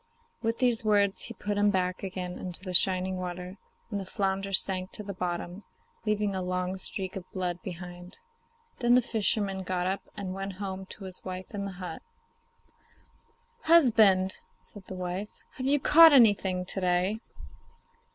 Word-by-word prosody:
With 230 0 -1
these 245 -3 +2
words 205 -2 +2
he 230 - -6
put 205 0 -2
him 205 0 +4
back 185 -2 0
again 185 -2 -5
into 180 -1 -5
the 185 -2 -5
shining 185 +1 +3
water, 180 +1 -6 0.3
and 205 - -1
the 195 - -5
flounder 195 0 -1
sank 185 -1 0
to 210 - -4
the 200 0 -6
bottom, 180 +1 -4 0.4
leaving 210 -1 +1
a 190 - -2
long 180 0 -2
streak 190 0 -3
of 185 -2 -8
blood 180 -2 -3
behind. 180 0 -9 0.6
Then 240 -1 +4
the 250 - +4
fisherman 205 -3 0
got 180 -1 -2
up, 190 +2 -1 0.2
and 190 -2 -4
went 195 0 -5
home 190 0 -6
to 200 - -9
his 185 -1 -8
wife 185 +1 -7
in 200 -1 -3
the 195 - -5
hut. 180 0 -7 1.6
'Husband,' 220 - +5 0.2
said 205 -3 -9
his 190 - -6
wife, 185 +3 -4 0.2
'have 265 -3 -4
you 290 +1 +3
caught 315 0 +8
nothing 190 -5 +3
to 190 - -3
day? 180 +4 +1
190 Hz, 165 wpm, -28 LUFS, 185-205 Hz, 1.6 s, caught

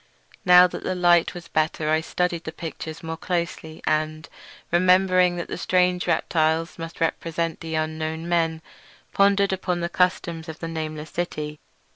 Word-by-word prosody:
Now 180 0 +9
that 180 - -4
the 185 - -2
light 175 -1 +3
was 175 -1 -8
better 155 0 0
I 155 0 +3
studied 175 0 -2
the 160 - -4
pictures 160 0 -7
more 160 0 -4
closely, 170 -2 -4
and, 155 0 -1 0.4
remembering 185 0 +4
that 175 - -4
the - - -5
strange 180 -1 +1
reptiles 160 +1 +1
must 165 0 -7
represent 165 0 -1
the 160 -1 -5
unknown 155 +1 -3
men, 165 -2 0 0.5
pondered 200 0 +3
upon 180 -2 -2
the 170 - -1
customs 170 -3 0
of 160 - -7
the 165 - -5
nameless 155 -1 -5
city. 150 -3 -4
165 Hz, 155 wpm, -24 LUFS, 160-180 Hz, 0.5 s, Now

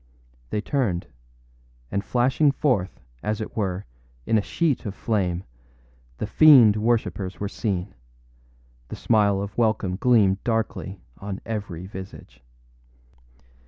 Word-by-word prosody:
â - - -33
They 105 - -1
turned; 110 -10 -1 0.9
and 100 - -1
flashing 130 +6 +2
forth, 125 -10 -1 0.2
as 105 0 -2
it 110 - -6
were, 95 -3 -2 0.4
in - - +1
a 110 - +4
sheet 155 +5 0
of 100 - -5
flame, 95 -6 -1 0.7
the - - -3
fiend 120 -3 +7
worshippers 105 -5 -1
were 100 - -2
seen; 100 -2 -3 0.9
the - - -7
smile 105 -3 +2
of 100 0 -7
welcome 110 -5 +1
gleamed 100 -5 +3
darkly 110 -4 -2 0.2
on 100 0 -5
every 100 -6 -5
visage. 95 -9 -10
105 Hz, 125 wpm, -24 LUFS, 95-115 Hz, 0.9 s, fiend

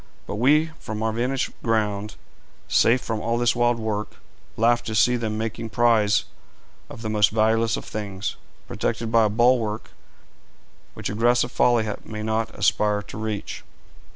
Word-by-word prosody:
But 100 - -5
we 150 +7 +3
from 110 0 -5
our 110 - +1
vantage 125 +3 -1
ground, 105 -2 -1 0.5
safe 120 +2 +3
from 110 -2 -3
all 115 0 0
this 120 0 +2
wild 120 0 +2
work, 110 -2 -3 0.4
laugh 120 +1 +3
to 110 - -3
see 125 +3 +4
them 110 -3 -2
making 115 +1 -4
prize 110 -3 +3 0.7
of 115 - -10
the - - -3
most 105 -2 +4
valueless 115 +1 +2
of - - -7
things, 100 -1 -4 0.3
protected 115 -1 -2
by 115 -2 +5
a - - +2
bulwark 115 -1 +1 1.0
which - - -4
aggressive 120 +3 +2
folly 120 -3 +2 0.2
may 110 -1 -6
not 110 +1 -1
aspire 105 0 +1
to - - -10
reach.' 110 -2 -4
110 Hz, 155 wpm, -24 LUFS, 105-120 Hz, 1.0 s, by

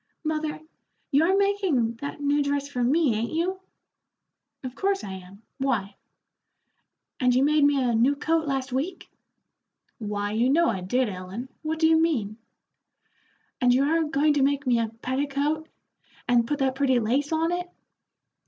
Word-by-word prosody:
"Mother, 310 -1 -2 0.5
you 285 +2 +4
are 375 +4 +3
making 375 - +1
that 285 +4 -6
new 290 +1 +2
dress 285 0 -1
for 250 -4 -2
me, 285 +1 +3
ain't 225 +2 -2
you?" 360 +4 -1 1.0
"Of 255 -1 -5
course 390 +6 -1
I 195 - -6
am; 190 +3 -12 0.2
why?" 220 -8 -1 1.2
"And 250 -2 +3
you 260 - +4
made 300 +1 +3
me 285 -1 +3
a 245 -2 +1
new 245 +6 +3
coat 320 +2 0
last 270 -2 -2
week?" 290 +9 -3 0.9
"Why, 205 -1 -3
you 230 +4 +1
know 335 +5 +3
I 195 -5 -2
did, 245 +8 0
Ellen; 195 +6 -7
what 315 0 -2
do 320 - +2
you 320 0 +4
mean?" 225 -11 0 1.2
"And 245 -1 +4
you 265 - +3
are 325 +3 +2
going 300 0 +2
to 290 - +1
make 280 +1 +1
me 245 -2 +3
a 230 - 0
petticoat 280 +6 -2 0.6
and 240 -2 +3
put 295 - -1
that 265 -2 +1
pretty 265 -2 +2
lace 260 +7 0
on 325 +1 +1
it?" 355 0 -3
275 Hz, 165 wpm, -25 LUFS, 240-310 Hz, 1.2 s, you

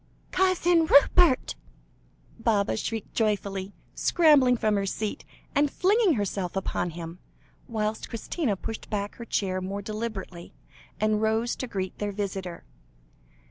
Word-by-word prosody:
"Cousin 355 -3 +3
Rupert!" 285 0 +5 0.9
Baba 205 - +1
shrieked 220 - -4
joyfully, 200 -3 -1 0.2
scrambling 290 -7 +4
from 215 -1 +1
her 200 -1 0
seat, 215 +2 -3 0.3
and 290 0 +3
flinging 395 +3 +3
herself 195 -4 -2
upon 190 -2 -1
him, 170 +1 -8 0.5
whilst 215 -1 -2
Christina 230 - -2
pushed 220 +4 -6
back 205 -1 -3
her 235 - -7
chair 185 -4 -1
more 195 +2 -4
deliberately, 210 -5 -6 0.4
and 215 0 +1
rose 220 +2 +1
to 255 - -4
greet 190 -4 -4
their 205 0 -2
visitor. 195 -3 -4
215 Hz, 125 wpm, -27 LUFS, 195-250 Hz, 0.9 s, Rupert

